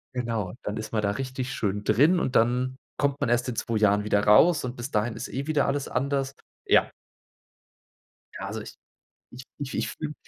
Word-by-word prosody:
Genau, 115 -6 -2
dann 105 - -3
ist 110 0 -5
man 110 - 0
da 100 - +2
richtig 130 +2 -4
schön 105 0 -2
drin 150 - +4
und 130 - -2
dann 125 +3 +2 0.2
kommt 140 0 0
man 140 - +1
erst 120 +1 +2
in 125 - -3
2 115 0 -1
Jahren 105 -1 +3
wieder 105 -1 +1
raus. 150 +10 +6
Und 125 0 -4
bis 120 +1 -5
dahin 110 +1 0
ist - - -5
eh 135 +2 -4
wieder 150 -2 +2
alles 140 0 -1
anders, 135 +1 -1 0.3
ja. - - +4 1.5
Ja, - - -5
also - - -5
ich - - -10 0.6
ich 125 - -10 0.2
ich 140 -2 -5
ich - - -1
fühle 150 -1 -5
125 Hz, 200 wpm, -26 LUFS, 110-135 Hz, 1.5 s, raus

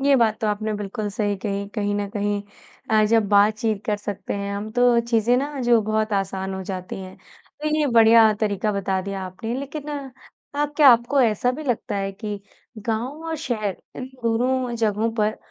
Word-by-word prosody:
ये 280 +1 +4
बात 220 -3 +2
तो 220 - 0
आपने 215 +1 -1
बिल्कुल 205 +1 -4
सही 205 -2 -1
कही, 200 0 -3
कहीं 205 -1 -1
न 205 -1 -2
कहीं। 205 -1 -1 0.5
अ, 215 -1 +5
जब 220 -2 +2
बातचीत 210 +1 +2
कर 210 -1 +1
सकते 205 -1 -5
हैं 200 0 -3
हम 210 +2 -5
तो 245 -1 +4
चीज़ें 230 +2 +3
ना 280 +1 -2
जो 240 -2 +4
बहुत 215 0 -1
आसान 190 -1 -2
हो 190 - -5
जाती 185 -1 -5
हैं। 185 0 -9 0.5
तो 305 - +1
ये 300 -1 +2
बढ़िया 225 -2 +6
तरीका 210 0 0
बता 195 -1 -1
दिया 195 0 -4
आपने 225 +6 -5
लेकिन 285 +2 -6 0.7
आप 295 0 -1
क्या 295 -3 +8
आपको 240 +4 +2
ऐसा 225 +2 +2
भी 305 +4 -6
लगता 240 -5 -1
है 195 0 -2
कि 205 0 -6 0.5
गाँव 250 +8 -2
और 320 - -2
शहर 215 - -2 0.2
इन 255 - -5 0.2
दोनों 245 +2 +1
जगहों 220 0 +1
पर 215 -1 0
215 Hz, 190 wpm, -23 LUFS, 200-240 Hz, 0.7 s, क्या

